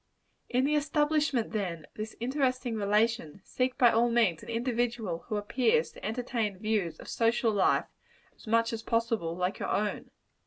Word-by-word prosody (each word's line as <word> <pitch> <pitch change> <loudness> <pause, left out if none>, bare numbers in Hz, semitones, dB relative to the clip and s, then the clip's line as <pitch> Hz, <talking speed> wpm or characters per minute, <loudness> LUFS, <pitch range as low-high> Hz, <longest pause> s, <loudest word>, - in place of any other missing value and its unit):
In 255 +2 +2
the 295 - +1
establishment, 295 -4 +1
then, 180 -7 -3
of - - -30
this 215 +1 -6
interesting 255 -1 0
relation, 210 -4 +1
seek 255 0 -1
by 240 -2 +6
all 235 +2 +3
means 225 -9 +2
an - - -11
individual 235 -6 -1
who 215 - -1
appears 255 - +1
to - - -15
entertain 225 -3 -2
views 200 -6 -1
of - - -11
social 230 0 +2
life, 205 -2 +2 0.5
as - - -18
much 230 +1 +2
as 225 - -3
possible, 230 -8 -1
like 180 +2 -2
your - - -3
own. 210 0 -1
230 Hz, 165 wpm, -29 LUFS, 210-250 Hz, 0.5 s, by